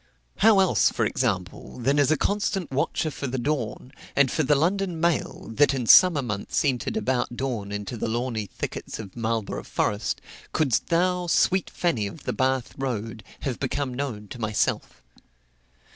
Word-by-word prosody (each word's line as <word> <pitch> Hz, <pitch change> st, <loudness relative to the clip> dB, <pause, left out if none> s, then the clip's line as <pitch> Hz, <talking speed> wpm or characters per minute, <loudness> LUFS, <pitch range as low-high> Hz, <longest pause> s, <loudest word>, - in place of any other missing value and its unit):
How 215 Hz, -2 st, +6 dB
else, 190 Hz, -2 st, +4 dB
for 115 Hz, -, 0 dB
example, 100 Hz, -7 st, -2 dB
than 135 Hz, +4 st, +1 dB
as 145 Hz, -, +4 dB
a 155 Hz, -, +3 dB
constant 200 Hz, -1 st, -1 dB
watcher 155 Hz, +3 st, 0 dB
for 140 Hz, -, -5 dB
the 130 Hz, +1 st, -3 dB
dawn, 125 Hz, -2 st, -2 dB, 0.2 s
and 140 Hz, -3 st, +4 dB
for -, -, +1 dB
the 145 Hz, 0 st, +3 dB
London 180 Hz, +3 st, 0 dB
mail 170 Hz, -7 st, -1 dB
that 140 Hz, +3 st, +4 dB
in 125 Hz, -3 st, -2 dB
summer 165 Hz, +2 st, +7 dB
months 105 Hz, +6 st, -2 dB
entered 135 Hz, -, 0 dB
about 130 Hz, -, -1 dB
dawn 120 Hz, -7 st, -3 dB
into 105 Hz, +3 st, -4 dB
the -, -, -2 dB
lawny 115 Hz, -2 st, -2 dB
thickets -, -, -6 dB
of 100 Hz, -4 st, -9 dB
Marlborough 115 Hz, -2 st, -2 dB
Forest, 105 Hz, +1 st, -1 dB, 0.3 s
couldst 140 Hz, -7 st, +1 dB
thou, 180 Hz, +1 st, +1 dB
sweet 185 Hz, +2 st, +2 dB
Fanny 135 Hz, -, 0 dB
of 145 Hz, -, -10 dB
the -, -, -2 dB
Bath 130 Hz, -2 st, 0 dB
road, 115 Hz, -4 st, -3 dB, 0.2 s
have 130 Hz, -5 st, -3 dB
become 135 Hz, -1 st, -2 dB
known 125 Hz, -6 st, -4 dB
to 125 Hz, -, -8 dB
myself? 110 Hz, -1 st, -1 dB
130 Hz, 165 wpm, -25 LUFS, 115-155 Hz, 0.3 s, summer